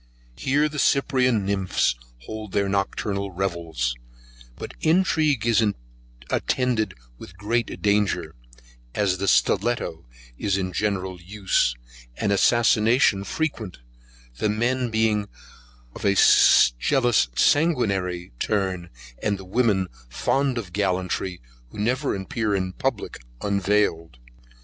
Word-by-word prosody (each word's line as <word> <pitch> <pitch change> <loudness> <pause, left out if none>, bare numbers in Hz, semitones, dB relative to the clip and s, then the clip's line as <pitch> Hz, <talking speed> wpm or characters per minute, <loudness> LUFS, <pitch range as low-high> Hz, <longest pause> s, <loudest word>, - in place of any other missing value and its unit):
Here 145 - +1
the 150 -1 -5
cyprian 130 -7 +2
nymphs 95 -7 +1 0.3
hold 110 -2 -7
their 100 -1 +1
nocturnal 100 0 -2
revels; 85 -9 -2 0.6
but - - -8
intrigue 155 - +2
is 115 -1 +3 0.7
attended 120 -6 0 0.2
with 90 - -12
great 115 +4 -2
danger, 105 -1 +1 0.6
as 95 -3 +1
the 100 - -2
stilletto 100 - +1 0.3
is 100 -2 0
in 95 -1 -3
general 95 -3 -2
use, 95 - 0 0.4
and 105 - 0
assassination 110 0 +3
frequent, 115 - -3 0.6
the 105 - 0
men 120 +4 0
being 110 -2 +1 0.7
of - - -10
a 100 0 +3 0.6
jealous 120 - +2
sanguinary 100 - +1
turn, 95 -4 -1 0.3
and 105 -2 0
the 95 - -11
women 100 -2 +1 0.2
fond 135 - 0
of 95 -7 -6
gallantry, 95 -2 -1 0.3
who - - -13
never 125 +6 0
appear 100 +2 -2
in 95 -1 -2
public 125 -1 -3 0.2
unveiled. 100 -7 0
105 Hz, 110 wpm, -24 LUFS, 95-120 Hz, 0.7 s, is